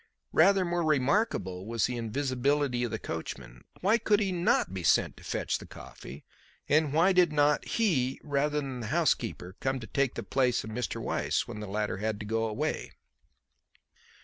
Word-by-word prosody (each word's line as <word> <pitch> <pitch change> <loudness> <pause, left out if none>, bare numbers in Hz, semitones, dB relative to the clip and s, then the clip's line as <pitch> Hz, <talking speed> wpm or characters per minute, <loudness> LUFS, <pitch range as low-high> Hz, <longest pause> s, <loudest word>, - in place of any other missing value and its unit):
Rather 190 +3 +5
more 175 0 0
remarkable 135 - +1
was 115 -1 +1
the 125 - -2
invisibility 130 +2 0
of 120 - -1
the - - -3
coachman. - - -7 0.2
Why 215 +5 +3
could 210 -2 +3
he 200 -3 0
not 175 - +1
be 95 - -4
sent 85 - +3
to - - -14
fetch - - -2
the - - -11
coffee, 70 - -11 0.4
and 150 0 +3
why 170 +6 +4
did 180 -2 +4
not 150 0 +3
he, 135 - +1
rather 150 0 0
than 135 -3 -5
the 115 - -5
housekeeper, 90 -2 0
come 135 0 -1
to 115 - -8
take 135 +3 0
the - - -4
place 130 -2 +1
of 110 - -7
Mr. 120 +1 -3
Weiss - - -1
when 105 - -7
the 105 - -6
latter 105 0 -2
had 105 +1 -2
to 105 - -6
go 115 +1 0
away. 105 - -3
135 Hz, 180 wpm, -29 LUFS, 110-155 Hz, 0.4 s, Rather